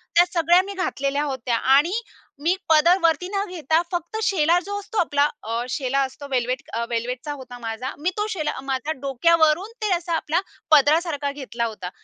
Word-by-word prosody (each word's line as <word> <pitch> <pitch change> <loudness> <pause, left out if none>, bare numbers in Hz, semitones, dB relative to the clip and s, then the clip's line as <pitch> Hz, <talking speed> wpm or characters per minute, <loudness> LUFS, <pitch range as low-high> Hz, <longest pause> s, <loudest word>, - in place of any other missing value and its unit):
त्या 350 +1 +7
सगळ्या 345 +2 +5
मी 400 - -6
घातलेल्या 285 -6 -1
होत्या. 260 -4 -2
आणि 300 - +3 0.4
मी 345 +4 +2
पदर 335 +4 +6
वरती 335 +2 +2
न 400 0 -1
घेता, 320 -2 +1
फक्त 350 +5 -3
शेला 340 -2 +3
जो 405 0 -3
असतो 425 +2 -8
आपला 290 -5 +3 0.2
अ, 230 +2 -2
शेला 270 +1 -1
असतो 270 +2 -4
वेल्वेट 250 +1 0
अ, 235 +1 -1
वेल्वेटचा 250 +4 -3
होता 250 -3 -10
माझा. 230 +3 -4
मी 345 +4 0
तो 420 +1 0
शेला 310 -10 -2
माझ्या 270 +3 -2
डोक्यावरून 315 - +2
ते 420 -3 0
असा 340 0 -3
आपला 325 +2 0 0.3
पदरासारखा 295 -1 +3
घेतला 255 -4 -4
होता. 200 -5 -5
300 Hz, 175 wpm, -23 LUFS, 260-345 Hz, 0.4 s, त्या